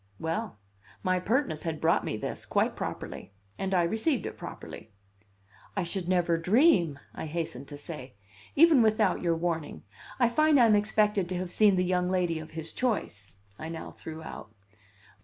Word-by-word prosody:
Well, 165 - -3 0.5
my 185 0 +2
pertness 225 - 0
had 160 -2 -3
brought 165 +1 +2
me 110 - -3
this - - -5
quite - - +1
properly! - - -6 0.3
And 195 0 -2
I 180 -2 +3
received 225 - 0
it - - -5
properly. 110 - -9 0.9
"I 190 - +1
should 175 +1 -4
never 175 -2 +2
dream 180 - +4
" - - -32
I - - -5
hastened 150 -4 -4
to 145 - -8
say; 145 -5 -8 0.4
"even 315 -4 +7
without 215 -3 +2
your 170 -2 +1
warning. 165 -2 -3 0.4
I 240 - +5
find 305 +4 +4
I'm 230 -3 +6
expected 210 -2 +2
to 185 - -2
have 180 0 -4
seen 210 -1 +5
the 180 0 +1
young 180 0 +1
lady 175 -3 0
of 155 0 -9
his 160 0 -5
choice," 110 - -2 0.2
I 160 - -5
now 165 -1 -6
threw 160 0 -9
out. 110 - -9
180 Hz, 175 wpm, -29 LUFS, 160-215 Hz, 0.9 s, even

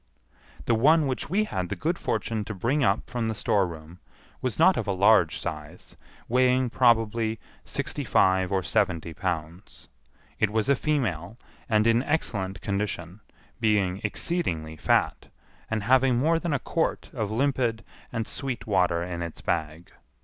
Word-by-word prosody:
The 120 - +2
one 150 +7 +4
which 130 0 -2
we 200 +5 +2
had 90 - -3
the - - -2
good 170 +3 -2
fortune 110 -2 -2
to 105 - -6
bring 130 +10 0
up 105 -3 +1
from 120 -2 -2
the 110 - -2
storeroom 85 -5 -1 0.4
was 130 -3 -1
not 180 +3 +5
of - - -3
a - - +1
large 95 -3 +4
size, 75 -1 -7 0.3
weighing 125 0 +2
probably 115 -2 +2 0.3
sixty - - -3
five 95 0 +2
or 95 -1 +1
seventy 85 -5 0
pounds. 85 -4 -5 0.5
It 110 - +3
was 110 +2 0
a 140 - +5
female, 115 - -2 0.3
and 110 -1 +3
in 115 +1 +4
excellent 100 - -2
condition, 100 -2 -3 0.4
being 100 -4 +1
exceedingly 95 - -2
fat, - - +1 0.4
and 110 -2 -1
having 130 +2 +4
more 160 +6 +2
than 170 -1 -3
a - - +2
quart 160 +5 -2
of 110 -7 -2
limpid 120 -1 0 0.3
and 115 - -2
sweet 130 -2 -5
water 90 -4 +1
in 85 -1 -5
its 85 -1 -6
bag. 80 +2 -3
110 Hz, 155 wpm, -26 LUFS, 90-130 Hz, 0.5 s, not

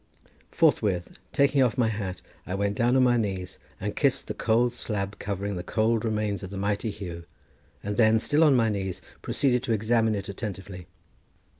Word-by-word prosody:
Forthwith 90 -4 +1
taking 140 0 +3
off 125 -1 +2
my 120 -3 +3
hat, 100 -4 -4 0.2
I 90 - -2
went 100 +1 0
down 120 +3 +2
on 130 - +5
my 120 -1 +4
knees 95 -5 -3 0.2
and - - -3
kissed - - +2
the - - -4
cold 120 +2 +2
slab 100 -4 -4
covering 100 -1 -3
the 90 - -4
cold 110 0 +1
remains 105 -3 -1
of 95 - -6
the 100 - -6
mighty 100 +3 -1
Huw, 85 -5 -7 0.6
and 105 0 -3
then, 110 -1 +5
still 145 +8 +2
on 150 -4 +6
my 115 -2 +3
knees, 95 -3 -3 0.2
proceeded 125 -4 +1
to 120 -2 -1
examine 110 0 +2
it 100 - -4
attentively. 95 -3 -6
105 Hz, 180 wpm, -27 LUFS, 100-120 Hz, 0.6 s, on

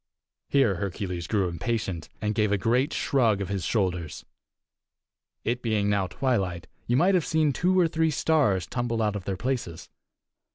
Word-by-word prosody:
Here 130 -10 +3
Hercules 90 -2 -4
grew 100 -4 +1
impatient, 90 -1 -3
and 105 -1 -1
gave 105 -1 +1
a 105 - +3
great 125 - +1
shrug 115 -8 +2
of 100 -2 -4
his 100 -3 -2
shoulders. 90 -5 -1 1.2
It 120 +2 -1
being 105 -3 +1
now 100 -2 +1
twilight, 95 -9 -1 0.2
you 120 - +2
might 185 +7 +4
have 180 -3 +3
seen 155 -2 +1
two 185 +6 +2
or 175 - +5
three 160 0 +1
stars 140 - +2
tumble 120 -2 -2
out 105 -1 0
of 100 -3 -5
their 95 -1 -2
places. 120 -9 -3
110 Hz, 165 wpm, -26 LUFS, 95-130 Hz, 1.2 s, or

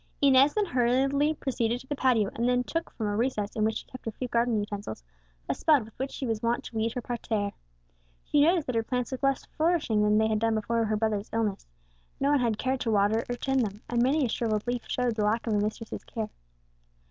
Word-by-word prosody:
Inez 275 +1 +5
then 420 -1 +2
hurriedly 275 +2 +2
proceeded 240 -4 -1
to 265 - -13
the 290 - -3
patio, 240 -7 +2
and 245 +2 +1
took, 330 0 -2
from 220 - -5
a 205 0 -1
recess 215 -3 -1
in 215 - 0
which 220 +1 +1
she - - -8
kept 255 - -12
her 225 - -2
few 250 +4 -5
garden 235 -1 +1
utensils, 205 - -5 0.4
a - - +1
spud 295 -8 +3
with 220 - -15
which 265 +1 -1
she 270 - -5
was 225 -3 -1
wont 235 +3 0
to 240 - -10
weed 225 +1 0
her 250 - -4
parterre. 220 -4 -2 0.7
She 295 - +2
noticed 330 +1 +4
that 255 - -3
her 225 - +3
plants 250 +2 -2
looked 260 +1 -5
less 275 -1 +1
flourishing 310 -10 +1
than 210 0 +3
they 220 0 +3
had 215 -1 +1
done 225 0 +1
before 230 +1 0
her 215 0 0
brother's 215 -1 -1
illness; 215 -3 -1 0.5
no 280 +1 +2
one 290 - +4
had 230 -4 +1
cared 260 +2 -1
to 235 - -2
water 215 +2 +3
or 245 - -1
tend 270 +2 0
them, 210 -3 -2
and 240 0 +1
many 275 +4 +3
a - - +1
shrivelled 220 -2 -1
leaf 245 0 -1
showed 250 -2 0
the 215 -1 -1
lack 215 +3 +1
of 225 - 0
a 205 - +2
mistress's 215 +2 -3
care. 220 -2 -5
235 Hz, 240 wpm, -28 LUFS, 215-260 Hz, 0.7 s, Inez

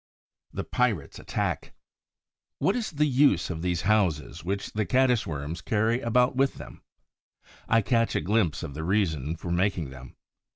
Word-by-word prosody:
THE - - -4
PIRATES' - - -1
ATTACK - - -3 0.8
What - - +1
is 240 -3 -2
the 150 -2 +1
use 130 - +3
of 80 -2 -5
these 90 -1 -1
houses 90 -7 +1
which 100 +3 -3
the 110 - 0
Caddis 125 -1 +2
worms 80 +2 -4
carry 115 +3 +1
about 125 +2 +2
with 135 +1 +2
them? - - -11 0.9
I 115 0 +5
catch 115 +1 +1
a - - +1
glimpse 95 -2 +1
of 70 - -6
the 80 +3 -5
reason 80 -6 0
for 85 +1 -6
making 85 -5 0
them. 65 -1 -12
100 Hz, 160 wpm, -27 LUFS, 80-115 Hz, 0.9 s, I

